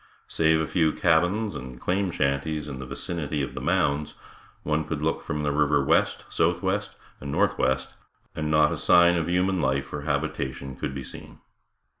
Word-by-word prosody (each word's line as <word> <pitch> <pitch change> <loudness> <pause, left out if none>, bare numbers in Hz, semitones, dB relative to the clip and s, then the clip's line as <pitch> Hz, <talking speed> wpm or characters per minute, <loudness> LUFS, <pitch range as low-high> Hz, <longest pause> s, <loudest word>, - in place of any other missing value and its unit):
Save 80 0 +2
a - - 0
few 80 -1 +2
cabins 90 +5 +2
and 65 -1 -8
claim 95 +1 0
shanties 75 0 -1
in 65 -3 -6
the 65 - -7
vicinity 75 0 -3
of 70 - -5
the - - -6
Mounds, 70 +1 0 0.5
one 75 0 0
could 75 -1 -4
look 80 - 0
from 75 -2 -3
the 75 - +1
river 75 -1 +2
west, - - +2
southwest 95 +4 0 0.2
and 70 +1 -6
northwest, 65 -1 +1 0.4
and 75 0 -2
not 75 -1 +4
a - - -3
sign 85 0 +5
of 85 -2 -1
human 90 +1 +1
life 65 0 -1
or 75 - -3
habitation 70 -3 -3
could 65 - -4
be 70 - -5
seen. - - -10
75 Hz, 175 wpm, -26 LUFS, 70-85 Hz, 0.5 s, sign